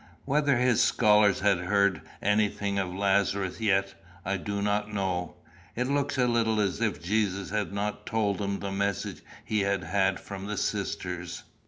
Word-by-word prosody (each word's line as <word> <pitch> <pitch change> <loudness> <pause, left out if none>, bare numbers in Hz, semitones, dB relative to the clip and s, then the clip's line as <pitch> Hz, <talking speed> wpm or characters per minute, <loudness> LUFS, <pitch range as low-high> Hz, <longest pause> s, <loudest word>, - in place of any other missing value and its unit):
"Whether 145 -2 +2
his 125 -2 +3
scholars 105 -2 +4
had 100 -3 +3
heard 100 -1 +2 0.2
anything 105 -1 +1
of 95 -2 -2
Lazarus 100 +1 0
yet, 100 -2 +2 0.3
I 95 - 0
do 100 +2 -3
not 105 +1 0
know. 95 -3 -2 0.4
It 125 - 0
looks 140 +1 0
a 125 - +3
little 115 -2 +2
as 100 -3 0
if - - -1
Jesus 100 -1 0
had 105 -2 -1
not 105 +1 -3
told 105 -3 0
them 100 -1 -2
the 100 - -3
message 100 0 -2 0.2
he 110 - 0
had 100 0 0
had 95 -1 +1
from 100 0 -7
the 105 0 -3
sisters. 90 -2 -3
100 Hz, 165 wpm, -28 LUFS, 95-105 Hz, 0.4 s, scholars